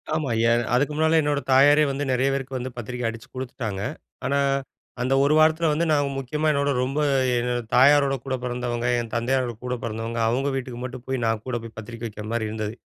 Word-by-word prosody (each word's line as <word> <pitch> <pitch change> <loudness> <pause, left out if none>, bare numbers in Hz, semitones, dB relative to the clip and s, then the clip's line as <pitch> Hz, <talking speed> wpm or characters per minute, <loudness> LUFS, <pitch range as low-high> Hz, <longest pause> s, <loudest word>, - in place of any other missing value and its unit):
ஆமா. 150 -5 -1 0.2
எ - - +4 0.2
அதுக்கு 145 +4 +2
முன்னால 160 +1 +3
என்னோட 145 -1 0
தாயாரே 145 +3 +6
வந்து 140 +1 -2
நெறைய 130 +2 +2
பேருக்கு 135 -1 -3
வந்து 130 +1 -4
பத்திரிக்கை 125 +1 -4
அடிச்சு 115 0 -9
குடுத்துட்டாங்க. 115 -6 -4 0.4
ஆனா 140 - +1 0.6
அந்த 130 +2 +1
1 145 +2 +3
வாரத்தில 160 +1 +4
வந்து 165 +3 +1
நாங்க 145 -2 +2
முக்கியமா 150 +4 -2
என்னோட 140 0 +1
ரொம்ப 135 +3 -2 0.4
என்னோட 120 0 -1 0.2
தாயாரோட 140 +1 +6
கூட 130 -1 -2
பிறந்தவங்க, 120 -1 -2
என் 115 -1 -5
தந்தையாரோட 125 0 0
கூட 125 0 -2
பிறந்தவங்க, 115 +1 -3
அவங்க 135 +4 0
வீட்டுக்கு 125 -2 -5
மட்டும் 125 -1 -6
போய் 130 0 -1
நான் 110 -1 0
கூட 125 - -2
போய் 115 -2 -10
பத்திரிக்கை 115 +2 -7
வைக்கிற 105 -1 -8
மாரி 115 -2 -1
இருந்தது. 110 0 -4
130 Hz, 190 wpm, -24 LUFS, 120-140 Hz, 0.6 s, தாயாரே